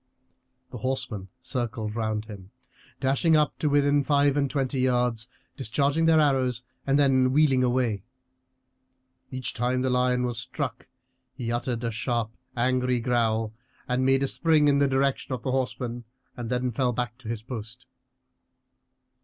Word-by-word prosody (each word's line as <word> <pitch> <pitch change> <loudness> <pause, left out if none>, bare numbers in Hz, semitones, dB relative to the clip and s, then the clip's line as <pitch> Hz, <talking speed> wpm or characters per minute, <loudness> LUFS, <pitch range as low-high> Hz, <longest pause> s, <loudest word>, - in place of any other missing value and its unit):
The 125 - -7
horsemen 120 -6 -3
circled 115 -4 -3
round 110 -1 -1
him, 100 -4 -10 0.5
dashing 140 +5 +3
up 150 -1 +2
to 150 - +1
within 145 0 +3
five 140 0 +3
and 140 -2 +1
twenty 135 -2 -1
yards, 125 -2 +1 0.3
discharging 140 +6 +1
their 165 -1 +5
arrows, 130 -5 +2 0.2
and 140 +1 +3
then 130 -3 +4
wheeling 135 -3 +4
away. 120 -5 +1 1.3
Each 130 -1 -2
time 125 +2 0
the 130 0 0
lion 125 0 +2
was 120 -2 -2
struck 130 -1 -5 0.5
he 120 -3 -3
uttered 120 0 -2
a 115 - -1
sharp, 115 0 -1 0.3
angry 125 0 +1
growl, 115 -2 0 0.3
and 125 +1 0
made 135 +1 +3
a - - +1
spring 155 0 +3
in 140 -1 +4
the 140 - +4
direction 135 0 0
of 120 - -10
the 130 - -1
horsemen, 120 -1 -2 0.3
and 120 -2 -5
then 125 0 0
fell 125 +1 0
back 120 0 -3
to 120 - -12
his 115 -1 -4
post. 120 +1 -8
125 Hz, 155 wpm, -26 LUFS, 120-135 Hz, 1.3 s, their